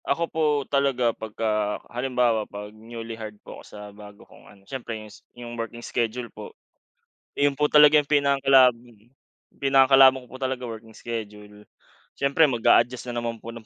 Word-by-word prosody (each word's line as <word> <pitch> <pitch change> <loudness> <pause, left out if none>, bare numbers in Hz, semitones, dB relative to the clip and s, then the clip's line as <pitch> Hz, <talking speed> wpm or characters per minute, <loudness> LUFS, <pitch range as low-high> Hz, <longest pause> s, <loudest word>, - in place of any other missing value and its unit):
Ako 170 - 0
po 160 - -2 0.2
talaga 135 -4 +1
'pagka 105 -1 -2
halimbawa 120 -3 -1
'pag 105 +1 -9
newly 115 +1 -9
hired 110 -2 -9
po - - -10
ako - - -17
sa 105 - -12
bago 105 0 -14
kong - - -19
ano 100 - -19
siyempre 120 -2 -6
s 105 -1 -15 0.2
yung 120 -1 -8
working 120 0 -7
schedule 120 +1 -2
po. - - -11 0.8
'Yon 145 -1 0
po 150 - +2
talaga 150 0 +6
yung 150 - +2
pinakakalab 135 -3 +4
mm, 115 -2 -21 0.5
pinakakalaban 135 -1 +5
ko 125 - -17
po 130 - -10
talaga 130 -2 -4
working 110 0 -10
schedule 105 -2 -8 0.5
siyempre 140 +3 +3
mag-a-adjust 120 0 +2
na 120 - -5
naman 115 -1 -5
po 115 - -7
ng 115 -1 -12
120 Hz, 165 wpm, -24 LUFS, 110-135 Hz, 0.8 s, talaga